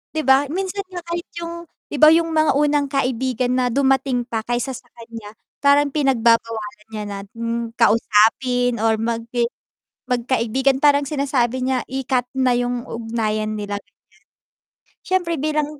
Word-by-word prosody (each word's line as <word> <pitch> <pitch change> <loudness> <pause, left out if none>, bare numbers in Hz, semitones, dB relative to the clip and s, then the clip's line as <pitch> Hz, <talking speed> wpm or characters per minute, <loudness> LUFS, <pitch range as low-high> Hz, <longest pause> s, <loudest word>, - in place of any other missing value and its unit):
'di 315 - +1
ba, 265 +2 +4
minsan 380 +5 -3
nga 355 -2 -8
kahit 340 0 -5
yung 340 0 -6 0.2
'di 295 - -3
ba 305 - +8
yung 330 0 +1
mga 310 -3 +2
unang 290 0 +2
kaibigan 255 -2 0
na 250 - +2
dumating 265 -1 +1
pa 230 -2 -3
kaysa 240 +2 -1
sa 255 - -10
kanya 230 -2 -10 0.2
parang 285 +1 +4
pinagbabawalan 230 -6 +1
niya 215 - -4
na, 200 - -5 0.2
hmm, 230 0 -3
kausapin 235 +2 +3
or 225 0 +2
mag 230 +1 -2 0.9
magkaibigan 260 +2 +1
parang 285 -1 +4
sinasabi 265 -3 0
niya 255 -1 0
i-cut 260 -1 -1
na 260 -2 +2
yung 245 0 -2
ugnayan 215 -2 -2
nila, 205 -1 -4
ganyan. 205 +1 -28 1.0
Siyempre 360 -2 0
bilang 300 0 -2
255 Hz, 145 wpm, -21 LUFS, 230-285 Hz, 1.0 s, ba